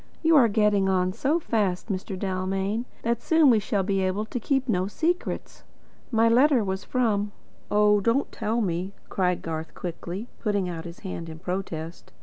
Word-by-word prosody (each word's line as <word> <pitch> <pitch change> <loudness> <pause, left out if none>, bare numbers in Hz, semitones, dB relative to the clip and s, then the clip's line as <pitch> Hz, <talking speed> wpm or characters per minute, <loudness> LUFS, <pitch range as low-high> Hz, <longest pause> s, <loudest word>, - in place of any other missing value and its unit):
"You 325 0 +5
are 260 -5 +7
getting 205 -2 +2
on 185 -1 +1
so 275 - +1
fast, 210 - -1
Mr. 190 0 -3
Dalmain, 195 +4 -1 0.2
that 235 0 0
soon 320 -2 +5
we 225 - +4
shall 200 -1 -1
be 195 0 0
able 190 +3 0
to 245 - -4
keep 270 +3 0
no 185 -5 +1
secrets. 335 - -2 0.5
My 225 -1 +3
letter 250 +1 +5
was 190 -1 -3
from 210 -5 0 0.2
" - - -32
"Oh, 210 0 +4
don't 230 +7 +1
tell 225 +3 -1
me," 185 0 -2 0.2
cried 180 -2 0
Garth 160 -1 -5
quickly, 180 +4 -5
putting 205 -4 0
out 165 -1 -5
his 170 0 -9
hand 170 -4 -6
in 160 - -8
protest. 175 -2 -5
200 Hz, 175 wpm, -26 LUFS, 185-230 Hz, 0.5 s, are